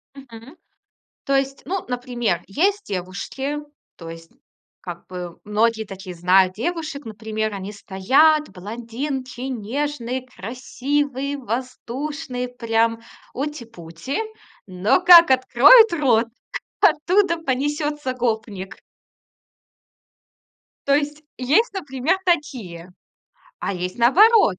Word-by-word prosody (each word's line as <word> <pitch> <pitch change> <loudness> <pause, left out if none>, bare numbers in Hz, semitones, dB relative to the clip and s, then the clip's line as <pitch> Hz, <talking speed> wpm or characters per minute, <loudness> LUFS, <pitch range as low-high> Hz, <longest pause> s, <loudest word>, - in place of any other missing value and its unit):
Мгм. 260 +1 -13 0.7
То 275 - +2
есть, 270 0 -2
ну, 380 0 -2
например, 245 -7 -2
есть 395 - 0
девушки, 200 +10 -4 0.4
то 165 - -10
есть, 165 0 -11 0.5
как 175 -2 -8
бы 180 -2 -7
многие 220 +2 +1
таких 195 -2 -9
знают 185 +2 +3
девушек, 315 - -4
например, 220 0 -4
они 195 +1 -6
стоят 270 +11 +3
блондинки, 240 +7 -6
нежные, 255 +1 -3
красивые, 270 +4 -3
воздушные, 255 +2 -4
прям 230 -2 0 0.3
ути-пути, 240 - -5 0.5
но 185 - +2
как 345 -5 +9
откроют 270 - +7
рот, 255 -8 +2 0.6
оттуда 350 +3 +3
понесётся 295 -1 -2
гопник. 220 -6 -3 2.1
То 280 - +4
есть, 295 +1 -2
есть, 295 - +2
например, 295 -1 -1
такие, 240 - -2 0.7
а - - -3
есть 180 +4 -5
наоборот. 350 - +5
250 Hz, 95 wpm, -22 LUFS, 210-295 Hz, 2.1 s, как